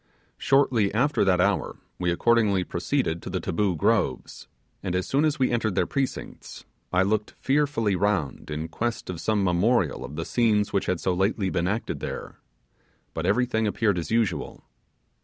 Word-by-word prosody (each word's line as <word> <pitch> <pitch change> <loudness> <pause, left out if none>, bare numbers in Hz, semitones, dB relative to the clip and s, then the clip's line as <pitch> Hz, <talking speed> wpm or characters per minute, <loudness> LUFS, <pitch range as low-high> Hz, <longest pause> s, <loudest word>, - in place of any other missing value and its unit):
Shortly 130 -7 +3
after 140 +3 +2
that 90 -2 +3
hour 100 +2 +1 0.2
we 90 - 0
accordingly 105 +1 +2
proceeded 85 -1 -1
to - - -7
the - - -2
Taboo 95 +2 0
Groves, 75 - 0 0.3
and 90 - -3
as 90 - 0
soon 140 +3 +1
as 150 -2 +1
we 130 - +1
entered 110 -5 0
their - - +2
precincts, 135 -3 -4 0.3
I 90 +1 +3
looked 105 +2 -1
fearfully 135 -7 +1
round 95 -9 -1
in, 75 +1 -3
quest 115 +4 -3
of 85 -3 -7
some 105 +3 +1
memorial 90 - +1
of 70 - -8
the 80 - -3
scene 110 -4 +2
which 100 - 0
had 90 -2 0
so 95 - 0
lately 95 +1 0
been 85 +1 0
acted 105 +4 -2
there; - - -6 0.7
but 80 +2 -2
everything 110 +1 +1
appeared 100 -3 +1
as 85 - -5
usual. 115 -4 -1
100 Hz, 170 wpm, -25 LUFS, 90-115 Hz, 0.7 s, Shortly